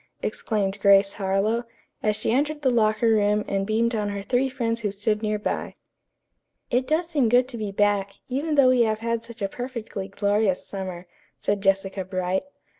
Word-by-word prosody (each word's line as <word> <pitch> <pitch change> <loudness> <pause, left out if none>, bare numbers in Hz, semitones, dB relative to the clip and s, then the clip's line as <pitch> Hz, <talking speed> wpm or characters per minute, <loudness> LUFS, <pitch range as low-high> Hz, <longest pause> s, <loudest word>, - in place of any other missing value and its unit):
exclaimed 200 -3 -1
Grace 200 0 +5
Harlowe, 200 +4 0 0.4
as 210 -1 +1
she - - -1
entered 295 +4 0
the 260 - +3
locker 215 -1 +2
room 210 -1 +2
and 195 0 -1
beamed 230 +2 +1
on 210 -2 -1
her 200 -1 -4
three 255 +5 +1
friends 230 -3 -2
who 210 - 0
stood 210 +2 -1
near 215 -1 0
by. 210 - -3 1.0
"It 250 +1 +1
does 315 +3 +1
seem 280 -8 +2
good 245 +2 +4
to 240 - -5
be 210 -2 -3
back, 200 -1 +1
even 290 +4 -1
though 275 -3 +6
we 255 -1 +4
have 220 -1 +1
had 230 0 -1
such 230 -2 -8
a - - +2
perfectly 230 -4 -6
glorious 200 -1 0
summer," 185 -3 -6 0.3
said 200 -1 -1
Jessica 195 0 +1
Bright. 185 +3 -2
215 Hz, 185 wpm, -25 LUFS, 200-240 Hz, 1.0 s, though